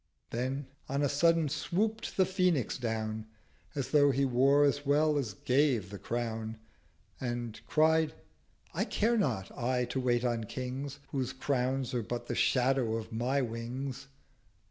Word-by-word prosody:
"' -, -, -49 dB
Then 130 Hz, +4 st, -2 dB, 0.2 s
on 140 Hz, +2 st, 0 dB
a -, -, +4 dB
sudden 165 Hz, +3 st, +3 dB
swoop'd 215 Hz, +10 st, -1 dB
The 190 Hz, -, +5 dB
Phoenix 180 Hz, -, +1 dB
down 110 Hz, -2 st, -2 dB, 0.5 s
As 140 Hz, -3 st, -3 dB
though 145 Hz, -2 st, +6 dB
he 140 Hz, +1 st, +2 dB
wore 135 Hz, +3 st, +4 dB
as 145 Hz, 0 st, +2 dB
well 150 Hz, +2 st, +3 dB
as 120 Hz, -9 st, -1 dB
gave 125 Hz, -6 st, +2 dB
The 100 Hz, -, -7 dB
Crown: 115 Hz, -1 st, -3 dB, 0.6 s
And 120 Hz, -3 st, -4 dB
cried—'I 160 Hz, 0 st, 0 dB
care 230 Hz, +3 st, +1 dB
not, 120 Hz, -, -1 dB
I, 125 Hz, +1 st, 0 dB
to 125 Hz, +2 st, -3 dB
wait 125 Hz, -1 st, +1 dB
on 115 Hz, -2 st, 0 dB
Kings, 130 Hz, +4 st, -5 dB
Whose 130 Hz, -3 st, -2 dB
crowns 130 Hz, -1 st, -1 dB
are 120 Hz, -, +1 dB
but 120 Hz, +2 st, -4 dB
the -, -, -3 dB
Shadow 125 Hz, -3 st, +2 dB
of 115 Hz, -1 st, -5 dB
my 125 Hz, +5 st, +1 dB
Wings!' 125 Hz, +4 st, -5 dB
130 Hz, 150 wpm, -31 LUFS, 120-145 Hz, 0.6 s, though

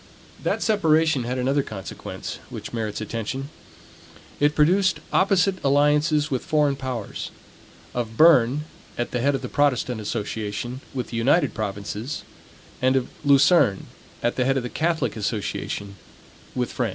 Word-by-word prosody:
That -, -, 0 dB
separation 160 Hz, -, +3 dB
had 125 Hz, +2 st, -2 dB
another 135 Hz, +3 st, +2 dB
consequence, 100 Hz, -7 st, -7 dB
which -, -, -7 dB
merits 110 Hz, -2 st, -3 dB
attention. 115 Hz, +6 st, -4 dB, 0.9 s
It 145 Hz, +1 st, +3 dB
produced 185 Hz, +5 st, +3 dB
opposite 190 Hz, -1 st, +3 dB
alliances 150 Hz, +2 st, +3 dB
with 130 Hz, -, -1 dB
foreign 150 Hz, -2 st, +2 dB
powers: 130 Hz, -5 st, -5 dB, 0.6 s
of 115 Hz, -2 st, -3 dB
Berne, 150 Hz, -3 st, +6 dB, 0.3 s
at 120 Hz, -, -2 dB
the 125 Hz, -, -1 dB
head 140 Hz, +2 st, +2 dB
of -, -, -4 dB
the -, -, -2 dB
Protestant 125 Hz, -5 st, +1 dB
association, 110 Hz, +3 st, -4 dB
with 125 Hz, -2 st, -3 dB
the 115 Hz, -, -4 dB
United 135 Hz, +9 st, +3 dB
Provinces; 105 Hz, +4 st, -4 dB, 0.6 s
and 130 Hz, +1 st, +3 dB
of 130 Hz, -2 st, 0 dB
Luzerne, 140 Hz, -, +4 dB, 0.4 s
at 120 Hz, -, 0 dB
the 125 Hz, -, +2 dB
head 135 Hz, +1 st, +2 dB
of 130 Hz, -, -1 dB
the 125 Hz, -, -4 dB
Catholic 160 Hz, -7 st, 0 dB
association, 100 Hz, -1 st, -3 dB, 0.6 s
with 125 Hz, -1 st, -1 dB
France. 125 Hz, -3 st, 0 dB
130 Hz, 140 wpm, -24 LUFS, 115-150 Hz, 0.9 s, Berne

